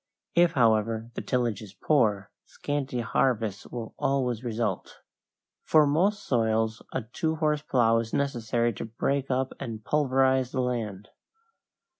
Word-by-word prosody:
If, 175 0 +4
however, 115 -2 +2
the - - -4
tillage 120 -5 -1
is 105 -2 -11
poor, 105 -10 +1 0.2
scanty 140 -4 -3
harvests 115 -4 0
will 115 -2 -7
always 125 -4 0
result. 110 -5 -3 0.6
For 155 -1 +5
most 185 +9 +1
soils 110 -2 +1
a - - -2
two 160 +8 -2
horse 150 -2 0
plow 115 -6 +3
is 115 -1 -4
necessary 120 -4 0
to - - -6
break 135 +4 -1
up 130 0 0
and 110 -2 -6
pulverize 130 -2 +2
the 130 - 0
land. 110 -6 -3
120 Hz, 135 wpm, -27 LUFS, 110-140 Hz, 0.6 s, For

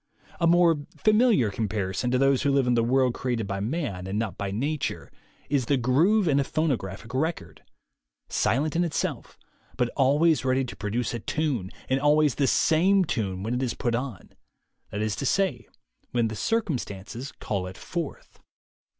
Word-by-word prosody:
A 170 - +3
more 170 -1 +5 0.2
familiar 215 - +3
comparison 105 +1 -2
to 125 - +2
those 135 0 +3
who 145 - +2
live 135 -1 +3
in 125 - +2
the 115 -1 +3
world 130 +1 +2
created 120 -4 -2
by 100 0 -3
man 105 - -3
and 100 +2 -2
not 110 -5 -2
by 100 - -3
nature 140 +9 -3 0.4
is 135 -5 0
the 140 - +3
groove 165 - +3
in 140 -2 +3
a - - +2
phonograph 120 - -2
record 160 +6 -3 0.4
— - - -60 0.2
silent 145 +6 0
in 175 - +3
itself, 170 - -3 0.4
but 125 -1 +1
always 145 +5 +3
ready 130 0 +1
to 120 - -8
produce 115 +4 -2
a 120 - -3
tune, 130 -8 -2 0.2
and 130 +1 +1
always 150 0 +4
the 140 - +1
same 185 +8 +3
tune, 95 - -2
when 115 +3 -2
it 125 - -1
is 125 -3 -1
put 120 -3 -1
on; 120 -5 -4 0.6
that 105 +1 -3
is 110 -1 -1
to - - -3
say, 180 -12 0 0.4
when 120 -2 +1
the 110 - -5
circumstances 130 - -3
call 95 -5 -3
it 95 - -9
forth. 170 -5 -6
130 Hz, 175 wpm, -26 LUFS, 110-155 Hz, 0.6 s, more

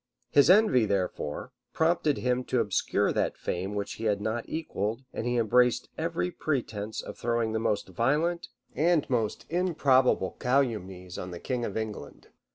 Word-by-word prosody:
His 145 +2 +5
envy, 185 - +5
therefore, 95 -6 -2 0.2
prompted 160 -2 +2
him 125 0 0
to 125 - 0
obscure 105 -4 +1
that - - 0
fame 95 +4 -3
which 100 0 -3
he - - -3
had 105 -2 +2
not 110 +3 -3
equalled; 115 -7 -3
and 115 - -3
he 120 0 +1
embraced 125 +2 +3
every 170 +2 -2
pretence 115 -10 -3
of - - -9
throwing 115 -1 0
the 110 - 0
most 105 -3 0
violent 150 - 0 0.3
and 165 +2 +2
most 115 -1 -1
improbable 140 - +2
calumnies 105 -9 -1
on 90 - -5
the 85 -1 -7
king 125 +3 -2
of 100 - -4
England. 110 -1 -6
120 Hz, 160 wpm, -28 LUFS, 105-145 Hz, 0.3 s, His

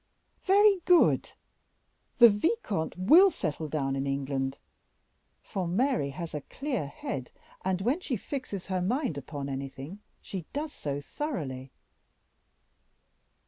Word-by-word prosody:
"Very 400 0 +6
good! 355 -2 +4 0.8
the 235 - +10
vicomte 210 - 0
will 320 - +7
settle 155 - -3
down 135 -3 -1
in 135 +1 -2
England, 135 -1 -2 0.9
for 185 -3 -3
Mary 225 - +1
has 160 +4 -6
a 150 - -3
clear 260 - -3
head, 135 -2 -5 0.3
and 190 0 0
when 250 - +1
she 270 -9 -2
fixes 230 -5 -5
her 185 -2 -1
mind 240 - 0
upon 140 0 -5
anything, 135 +6 -6 0.2
she 185 -5 -7
does 295 +1 -3
so 145 -1 -4
thoroughly." 140 - -4
180 Hz, 120 wpm, -29 LUFS, -, 0.9 s, the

